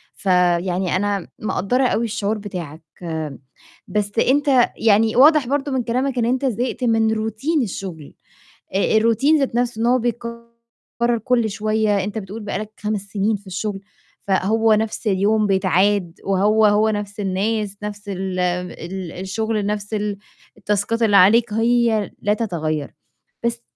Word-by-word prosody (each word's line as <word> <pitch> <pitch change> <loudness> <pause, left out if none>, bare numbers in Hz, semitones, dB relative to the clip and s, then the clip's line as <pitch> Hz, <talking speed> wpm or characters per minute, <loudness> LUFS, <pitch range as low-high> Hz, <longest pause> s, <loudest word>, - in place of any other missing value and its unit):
فيعني 180 0 +1
أنا 200 -1 -1
مقدّرة 215 +4 0
أوي 235 -1 0
الشعور 220 -1 -2
بتاعك، 175 -6 -7 1.0
بس 205 -1 -1
أنت 270 -2 +3
يعني 220 0 +3
واضح 290 +1 +6
برضه 280 +1 -1
من 260 -2 0
كلامك 255 +3 -1
إن 235 - +2
أنت 255 +3 0
زهقت 250 +1 -2
من 225 -2 +2
Routine 225 +9 -1
الشغل، 180 -7 -7 0.6
الRoutine 230 +9 +3
ذات 275 -4 -1
نَفْسه 240 -2 -1
إن 230 - +1
هو 250 +1 +4
بيتكرر 235 0 -4
كلّ 235 -3 +2
شوية 210 -1 0
أنت 210 +2 -4
بتقُول 210 +2 -7
بقى 205 - -3
لك 215 0 -7
5 210 0 -1
سنين 205 +1 -1
في 200 0 -18
الشغل، 195 +1 -4 0.5
فهو 215 +4 +3
نَفْس 220 +1 -2
اليوم 210 +2 +2
بيتعاد 190 -1 +1
وهو، 205 +3 +3
هو 210 +1 +3
نفْس 205 0 -4
الناس، 205 +1 -1
نفْس 205 0 -7
ال 190 -1 -3
ال 180 0 -3
الشغل 210 +3 -2
نفْس 205 +1 -3
ال 210 -1 -2 0.4
التاسكات 210 +2 -1
اللي 210 -3 +4
عليك 215 +4 +5
هي 225 -1 +2
لا 210 0 +2
تتغيّر، 160 -9 -3 0.5
بس 235 0 -1
210 Hz, 140 wpm, -21 LUFS, 195-235 Hz, 1.0 s, واضح